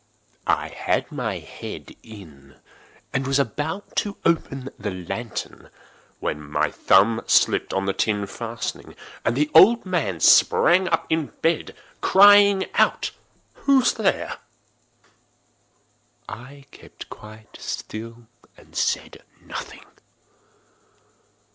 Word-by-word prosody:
I - - +1
had - - -2
my - - -3
head - - -9
in, 75 - -14 0.6
and 135 0 -1
was 135 0 +2
about 155 +7 -3
to 205 -1 -1
open 135 -5 -1
the 105 0 -3
lantern, 95 +5 -6 0.5
when 75 - -3
my 75 0 -1
thumb 110 +4 +3
slipped - - +3
upon 95 0 -1
the 100 - 0
tin 105 -1 0
fastening, 115 +3 -6 0.3
and 115 +3 0
the 150 +1 +1
old 220 +8 +7
man 150 - -2
sprang 185 - +5
up 165 -1 0
in 160 -2 0 0.2
bed, 165 -1 0 0.3
crying 200 0 +6
out—"Who's 270 -2 0
there?" 215 -4 -1 1.9
I 135 +4 -10
kept - - -13
quite 110 0 -13
still 115 +2 -7 0.3
and - - -20
said - - -2 0.2
nothing. - - -8
125 Hz, 105 wpm, -23 LUFS, 105-170 Hz, 1.9 s, old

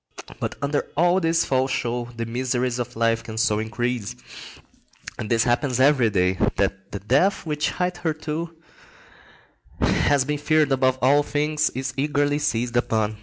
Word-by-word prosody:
But - - -3
under 145 +1 -1
all 175 +3 +4
this 165 -1 +1
false 130 0 +1
show, 120 -1 -2
the 115 - -2
miseries 125 +1 -1
of 125 0 -4
life 115 0 +1
can 110 -1 -8
so 110 -2 +2
increase—and 110 - -7
this 115 -1 +3
happens 125 +2 0
every 130 -4 +4
day—that 95 0 0
the 100 - -5
death 140 - +1
which 150 -1 -1
hitherto 165 -2 -3 1.3
has 140 -2 +2
been 150 +1 -2
feared 155 0 +2
above 130 -1 +2
all 140 +3 +5
things 150 +1 0
is 130 +1 -3
eagerly 145 +1 +1
seized 120 -3 -1
upon. 110 -2 0
130 Hz, 140 wpm, -23 LUFS, 115-150 Hz, 1.3 s, all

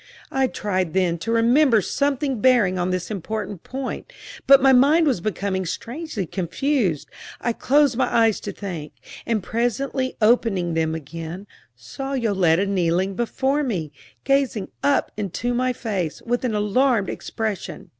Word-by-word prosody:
I 270 -1 +2
tried 185 -7 -2
then 180 -3 +1
to 225 - -3
remember 235 +2 +4
something 275 - -1
bearing 230 -8 +4
on 180 +1 0
this 185 +2 -2
important 205 -1 -4
point, 270 - -6 0.4
but 275 0 +9
my 270 0 +5
mind 290 +6 +5
was 255 - +1
becoming 190 -1 -2
strangely 235 - -4
confused. 185 - -1 0.3
I 235 - -1
closed 280 0 +2
my 260 - +1
eyes 225 -2 +3
to 205 - -5
think, 175 -7 -7 0.3
and 220 -4 0
presently 250 +4 -1
opening 215 -6 +2
them 160 0 0
again, 165 +5 -7 0.3
saw 195 - -6
Yoletta 195 -8 +2
kneeling 185 0 0
before 265 +6 0
me, 185 - -2 0.3
gazing 275 -7 +1
up 285 -1 +2
into 215 +4 -2
my 255 +1 +1
face 200 -10 -3
with 245 +1 -1
an 225 -4 -1
alarmed 210 +1 +2
expression. 215 -4 -5
220 Hz, 145 wpm, -22 LUFS, 185-260 Hz, 0.4 s, but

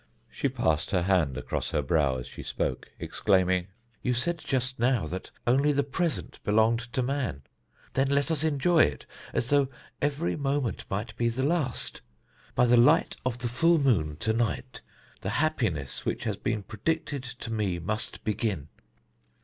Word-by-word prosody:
She - - 0
passed 80 0 0
her 90 -3 +1
hand 85 -8 +2
across - - -2
her 75 - 0
brow 70 -2 +2
as 60 - -5
she - - -9
spoke, 65 - -2
exclaiming: 95 -2 +2 0.3
"You 125 - +1
said 170 +7 0
just 130 -3 -1
now 120 -5 +2
that 90 +4 -5 0.2
only 135 +5 +4
the 140 0 +2
present 160 +3 -2
belonged 110 +2 +3
to 130 - +1
man. 125 - -2 0.5
Then 135 +1 +2
let 140 +3 +2
us 155 -2 +1
enjoy 160 +2 +3
it 70 - +3 0.3
as 120 - -1
though 140 -2 +4 0.3
every 145 +3 0
moment 140 -6 -1
might 105 +4 -3
be 120 0 +2
the 130 +3 -1
last. 145 -6 -1 0.5
By 125 - +5
the 120 0 +5
light 150 +8 +5
of 125 -2 -1
the 125 0 -3
full 165 +8 +4
moon 100 - +2
to 110 - +2
night, 115 -2 -2 0.4
the 95 - -2
happiness 115 - 0
which - - -2
has - - -1
been 105 -2 -2
predicted 140 +6 -2
to 125 -2 -6
me 100 -5 0
must 110 +6 -4
begin. 105 - -1
120 Hz, 165 wpm, -28 LUFS, 95-140 Hz, 0.5 s, By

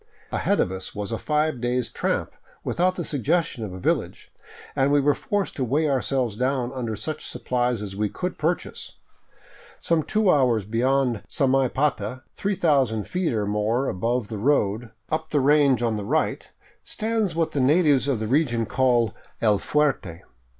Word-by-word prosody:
Ahead - - +1
of 90 - +1
us 95 0 -5
was 105 +1 -4
a 115 - -2
five 150 -4 0
days' 125 0 0
tramp - - -1 0.3
without 185 +1 +1
the 175 - -3
suggestion 150 -2 0
of 105 - -5
a 90 - -7
village, - - -2 0.4
and 135 +1 +2
we 145 - +5
were 145 +1 +3
forced 205 +5 -2
to 135 - 0
weigh 145 +6 +1
ourselves 130 -4 0
down 130 +1 -1
under 120 -4 -3
such 150 +10 -5
supplies 125 -3 -1
as 95 -2 -6
we 105 +1 0
could 180 - -4
purchase. 165 +3 -2 0.9
Some 165 -1 +1
two 210 +3 +2
hours 125 - +2
beyond 120 +1 +1
Samaipata, 130 -3 +1
3000 145 - +1
feet 180 -2 -1
or 105 -2 0
more 105 +6 0
above 115 +4 -1
the 110 -3 -5
road, 115 -3 +1 0.2
up 160 0 -1
the 150 - +2
range 140 -3 +4
on 115 -2 0
the 105 - -4
right, - - -1 0.3
stands 220 -5 -1
what 165 -1 0
the 145 - -1
natives 145 0 +4
of 135 -6 0
the 110 - -2
region 120 -2 +1
call 120 -4 +2
" - - -34
El 105 -3 +3
Fuerte." 135 - 0
130 Hz, 170 wpm, -24 LUFS, 110-150 Hz, 0.9 s, we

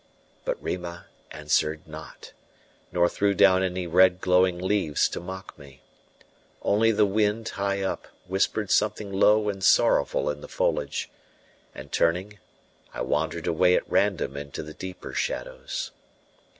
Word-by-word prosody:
But - - -2
Rima 85 -1 -5 0.2
answered 75 0 -1
not, 80 0 -11 0.6
nor 85 0 +3
threw 100 +2 0
down 95 0 +5
any 90 -1 -2
red 90 +1 +4
glowing 90 -1 +3
leaves 90 -5 +1
to - - -5
mock 95 +1 -8
me: 70 -3 -15 0.8
only 110 +3 +3
the 105 -1 +3
wind, 105 +2 0
high 100 0 -2
up, 95 - -3 0.2
whispered 95 +2 0
something 105 -1 +1
low 105 +2 +4
and 100 -2 -3
sorrowful - - +3
in 75 0 -8
the - - -9
foliage; - - -1 0.6
and 70 +1 -10
turning, 95 +5 0 0.6
I - - -4
wandered 80 +2 -1
away 90 +2 +3
at - - -1
random 100 -8 +1
into 70 0 -6
the 75 0 -9
deeper 95 +2 -8
shadows. - - -3
95 Hz, 135 wpm, -26 LUFS, 85-100 Hz, 0.8 s, down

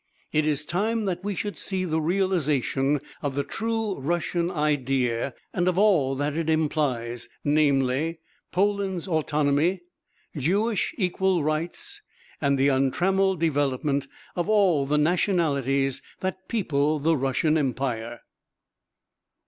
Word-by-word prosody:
It 155 0 +2
is 150 0 0
time 215 +7 0
that 180 -1 -2
we 205 0 -2
should 205 -1 -4
see 190 -1 -2
the 160 -2 0
realisation 150 -6 +1 0.2
of 140 -2 -2
the 140 - 0
true 225 -2 -2
Russian 170 +3 -1
idea 135 -6 0 0.2
and 175 0 0
of 185 -1 +1
all 175 -10 +3
that 145 +2 -1
it 165 -1 -1
implies, 140 -7 0
namely: 145 +1 +2 0.3
Poland's 195 -2 0
autonomy, 155 +1 +1 0.5
Jewish 195 - 0
equal 185 -3 +1
rights 170 - -3 0.4
and 140 -2 +2
the 135 +1 +4
untrammelled 180 +8 +2
development 140 -2 0 0.3
of 175 +3 -1
all 185 -10 +3
the 150 +1 +2
nationalities 145 - +1 0.2
that 190 0 -4
people 155 -8 +1
the 160 +3 +2
Russian 140 +3 +1
Empire. 125 -5 -2
155 Hz, 120 wpm, -25 LUFS, 140-185 Hz, 0.5 s, the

